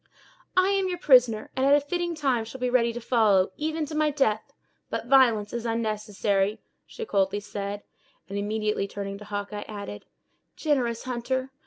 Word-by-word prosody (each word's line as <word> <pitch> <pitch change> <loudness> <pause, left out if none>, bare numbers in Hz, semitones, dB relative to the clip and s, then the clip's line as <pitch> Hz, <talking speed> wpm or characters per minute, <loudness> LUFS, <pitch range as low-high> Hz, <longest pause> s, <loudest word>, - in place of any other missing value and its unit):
"I 370 +1 +5
am 390 -1 +1
your 355 - -2
prisoner, 250 -9 +4
and, 260 - 0
at 280 +1 +6
a - - +5
fitting 345 +4 -2
time 265 -7 +1
shall 230 +4 -9
be 250 0 0
ready 235 -2 +3
to 235 - -5
follow, 215 -6 +3
even 310 +1 -2
to 300 - -8
my 305 0 +2
death. 270 -7 0 0.4
But - - -3
violence 235 -5 +4
is 235 -1 -3
unnecessary," 215 -3 0 0.3
she 460 - -7
coldly 195 - +1
said; 205 0 -5 0.4
and 195 - -7
immediately 210 0 -1
turning 200 0 -6
to 210 - -10
Hawkeye, 205 0 -4
added: 200 - -7 0.5
"Generous 250 -7 0
hunter! 255 +1 -2
230 Hz, 170 wpm, -26 LUFS, 205-275 Hz, 0.5 s, at